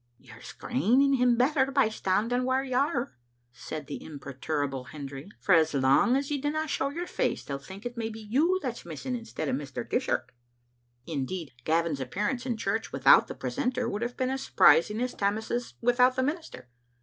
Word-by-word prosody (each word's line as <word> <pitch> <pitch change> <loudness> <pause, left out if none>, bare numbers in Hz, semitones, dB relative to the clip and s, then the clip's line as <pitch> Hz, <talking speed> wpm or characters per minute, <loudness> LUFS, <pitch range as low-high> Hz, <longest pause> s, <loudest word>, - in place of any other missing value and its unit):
" - - -44
" - - -44
You're - - -15
screening 250 - +1
him 250 -2 +4
better 265 +2 +3
by 270 -5 +3
standing 220 +4 0
whaur 260 +1 +1
you 260 -2 -4
are," 265 -1 0 0.4
said 150 +4 -7
the - - -7
imperturbable 140 -2 -4
Hendry; 140 +3 -8
"for 195 - +2
as 160 -3 +4
lang 135 - +4
as 275 +1 -1
you 285 -2 -1
dinna 310 +2 -1
show 275 -1 -1
your 340 +5 -4
face - - -1
they'll 140 -1 -4
think 195 - -11
it 245 0 -5
may 225 -1 -2
be 220 0 -8
you 290 - +1
that's 245 -3 -4
missing 175 - -5
instead 230 -9 -5
o' - - 0
Mr. 135 0 -4
Dishart." - - -1 0.7
Indeed, 160 +1 -4
Gavin's 165 -2 +1
appearance 210 - -2
in 240 -3 -1
church 220 +2 -2
without - - +6
the - - -7
precentor 250 -3 -2
would 210 -2 -3
have 240 +1 -3
been 255 0 0
as 265 0 -2
surprising 210 +6 +4
as 250 0 -1
Tammas's 220 +4 -2
without 250 +1 +4
the 260 - +1
minister. 295 - -4
230 Hz, 190 wpm, -28 LUFS, 160-260 Hz, 0.7 s, without